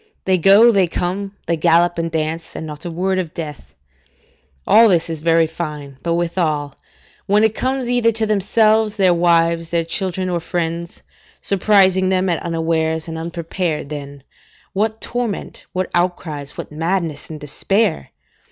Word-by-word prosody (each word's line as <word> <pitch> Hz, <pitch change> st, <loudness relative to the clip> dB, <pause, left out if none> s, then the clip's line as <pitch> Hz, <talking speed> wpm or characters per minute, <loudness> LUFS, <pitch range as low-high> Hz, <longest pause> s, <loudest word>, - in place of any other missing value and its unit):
They 185 Hz, -1 st, +2 dB
go, 200 Hz, +7 st, +7 dB
they 195 Hz, -4 st, +3 dB
come, 195 Hz, +4 st, -3 dB
they 170 Hz, -, +1 dB
gallop 170 Hz, +1 st, +3 dB
and 165 Hz, 0 st, -1 dB
dance, 160 Hz, +1 st, -3 dB
and 160 Hz, -, -5 dB
not 150 Hz, 0 st, -9 dB
a -, -, -3 dB
word 185 Hz, +3 st, -1 dB
of 170 Hz, -4 st, -5 dB
death. 150 Hz, -4 st, -8 dB, 0.9 s
All 225 Hz, 0 st, +6 dB
this 170 Hz, -3 st, +2 dB
is 160 Hz, -2 st, -5 dB
very 165 Hz, 0 st, +3 dB
fine; 150 Hz, -4 st, -6 dB
but 170 Hz, 0 st, 0 dB
withal, 160 Hz, -5 st, -1 dB, 0.5 s
when 205 Hz, +2 st, +3 dB
it 220 Hz, -1 st, +3 dB
comes 260 Hz, +1 st, -2 dB
either 245 Hz, -2 st, +3 dB
to 220 Hz, 0 st, 0 dB
themselves, 215 Hz, +1 st, +2 dB
their 190 Hz, -4 st, +4 dB
wives, 170 Hz, -1 st, +2 dB
their 170 Hz, -1 st, 0 dB
children, 185 Hz, +1 st, -2 dB
or 175 Hz, -1 st, -1 dB
friends, 170 Hz, 0 st, -4 dB, 0.4 s
surprising 190 Hz, -1 st, +3 dB
them 185 Hz, 0 st, +1 dB
at 170 Hz, -, 0 dB
unawares 160 Hz, -1 st, -1 dB
and 165 Hz, -, -5 dB
unprepared, 165 Hz, -2 st, -3 dB
then, 140 Hz, -2 st, -8 dB, 0.5 s
what 220 Hz, +2 st, -1 dB
torment, 240 Hz, -4 st, -4 dB
what 185 Hz, 0 st, -3 dB
outcries, 160 Hz, -5 st, -2 dB
what -, -, -7 dB
madness 165 Hz, -1 st, -2 dB
and 155 Hz, -1 st, -7 dB
despair! 190 Hz, -, -1 dB
170 Hz, 155 wpm, -19 LUFS, 160-195 Hz, 0.9 s, go